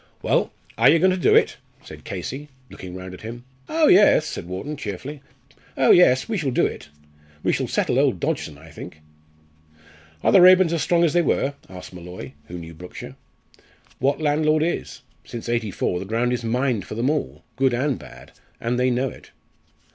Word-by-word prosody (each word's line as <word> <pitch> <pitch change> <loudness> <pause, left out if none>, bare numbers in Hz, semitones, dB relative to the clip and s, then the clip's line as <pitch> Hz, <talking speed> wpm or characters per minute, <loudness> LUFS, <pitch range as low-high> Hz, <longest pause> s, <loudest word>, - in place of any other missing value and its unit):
"Well, - - +1 0.3
are - - +7
you 165 - +6
going 185 +3 +4
to - - +1
do 180 - +3
it?" - - +3 0.3
said - - -12
Casey, 145 +3 -6 0.2
looking 90 -1 -9
round 95 0 -8
at 90 - -11
him. 120 +2 -8 0.3
"Oh, 320 0 +3
yes!" 190 - +6
said 85 - -6
Wharton, 95 +12 -5
cheerfully; 135 +4 -6 0.6
"oh, - - +5
yes! 130 -8 +5
we 225 - -2
shall 145 -4 -1
do 125 - +2
it. - - -5 0.5
We - - +2
shall - - -1
settle - - 0
old - - +2
Dodgson, 75 - -3
I 80 +2 -15
think." 75 - -10 1.2
"Are - - +4
the 195 - +7
Raeburns 185 -1 +7
as 165 - 0
strong 170 -1 +2
as 160 -3 +2
they 175 - +4
were?" 140 -3 0 0.2
asked 90 0 -10
Molloy, 90 -6 -9 0.2
who 90 - -7
knew 85 -1 -9
Brookshire. 90 +3 -10 0.8
"What 140 +3 +1
landlord 155 0 +2
is? 170 - -3 0.2
Since 120 -1 -8
'84 110 -6 -1
the 95 - -6
ground 115 +4 0
is 125 - -3
mined 120 -1 -1
for - - -6
them 120 +5 +1
all 155 -2 -3
good 130 -2 +2
and 135 +1 -1
bad - - -13 0.3
and 120 -1 -1
they 125 0 +3
know 125 +2 0
it." - - -14
125 Hz, 190 wpm, -23 LUFS, 95-155 Hz, 1.2 s, are